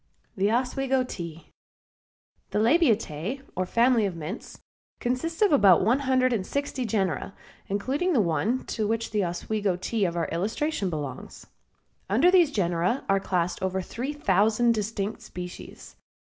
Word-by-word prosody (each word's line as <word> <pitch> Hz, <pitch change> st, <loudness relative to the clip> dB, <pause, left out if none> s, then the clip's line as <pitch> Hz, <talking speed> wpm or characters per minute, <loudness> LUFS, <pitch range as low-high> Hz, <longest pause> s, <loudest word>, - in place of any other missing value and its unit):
THE 200 Hz, +1 st, +1 dB
OSWEGO 260 Hz, +2 st, +1 dB
TEA. 170 Hz, -8 st, -8 dB, 1.0 s
The -, -, -2 dB
Labiatae, 230 Hz, -, +1 dB
or 185 Hz, 0 st, -1 dB
family 235 Hz, 0 st, +3 dB
of 185 Hz, -, -5 dB
mints, 165 Hz, +7 st, -7 dB, 0.4 s
consists 325 Hz, -, -1 dB
of 410 Hz, -, +4 dB
about 195 Hz, -, +6 dB
one 245 Hz, +5 st, +3 dB
hundred 260 Hz, -2 st, +2 dB
and 210 Hz, -5 st, 0 dB
sixty 280 Hz, +2 st, -3 dB
genera, 195 Hz, -4 st, -1 dB, 0.3 s
including 270 Hz, -, 0 dB
the 265 Hz, -, +3 dB
one 210 Hz, +7 st, 0 dB
to 215 Hz, -2 st, -2 dB
which 225 Hz, +1 st, -2 dB
the 210 Hz, -2 st, +1 dB
Oswego 190 Hz, +3 st, -1 dB
Tea 200 Hz, +3 st, -1 dB
of 175 Hz, -1 st, -2 dB
our 170 Hz, -, 0 dB
illustration 210 Hz, -, -1 dB
belongs. 145 Hz, -5 st, -6 dB, 0.6 s
Under 260 Hz, -, +4 dB
these 355 Hz, -5 st, +5 dB
genera 180 Hz, -, 0 dB
are 195 Hz, 0 st, +4 dB
classed 180 Hz, -2 st, -1 dB
over 190 Hz, 0 st, -1 dB
three 240 Hz, +9 st, -4 dB
thousand 225 Hz, -3 st, +2 dB
distinct 210 Hz, -1 st, -3 dB
species. 180 Hz, 0 st, -9 dB
215 Hz, 145 wpm, -26 LUFS, 185-255 Hz, 1.0 s, about